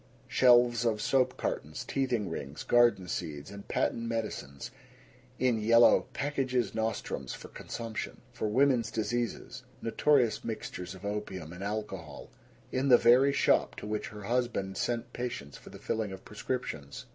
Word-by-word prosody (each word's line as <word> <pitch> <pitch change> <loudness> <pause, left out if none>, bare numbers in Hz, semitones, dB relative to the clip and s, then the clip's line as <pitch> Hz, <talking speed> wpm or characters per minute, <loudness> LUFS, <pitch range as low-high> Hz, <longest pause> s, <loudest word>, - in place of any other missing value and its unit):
Shelves 120 -1 +5
of 110 -3 +1
soap 130 +3 +2
cartons, 75 +1 -3
teething 125 -7 0
rings, 70 -3 -6
garden 120 -6 +4
seeds, 75 -2 -4
and 100 0 -10
patent - - 0
medicines 105 -12 -4 0.7
in 125 -3 +2
yellow 115 +2 +6
"packages 130 -6 -1
nostrums" 110 - -3
for - - -11
consumption, 115 -3 -6
for 120 -2 -2
"women's 125 0 +3
diseases" 115 +1 -3 0.2
notorious 120 -1 +2
mixtures 95 -4 -5
of 95 +2 -11
opium 95 -5 -4
and 90 +2 -7
alcohol, 100 -8 -5 0.4
in 130 +2 0
the 125 - +9
very 125 +5 +6
shop 140 - +2
to - - -8
which 105 0 -3
her 105 -1 -9
husband 120 -4 -1
sent 120 +3 -2
patients 120 - -5
for - - -12
the - - -10
filling 110 -3 -2
of 95 0 -9
prescriptions. 100 - -5
110 Hz, 145 wpm, -30 LUFS, 95-120 Hz, 0.7 s, the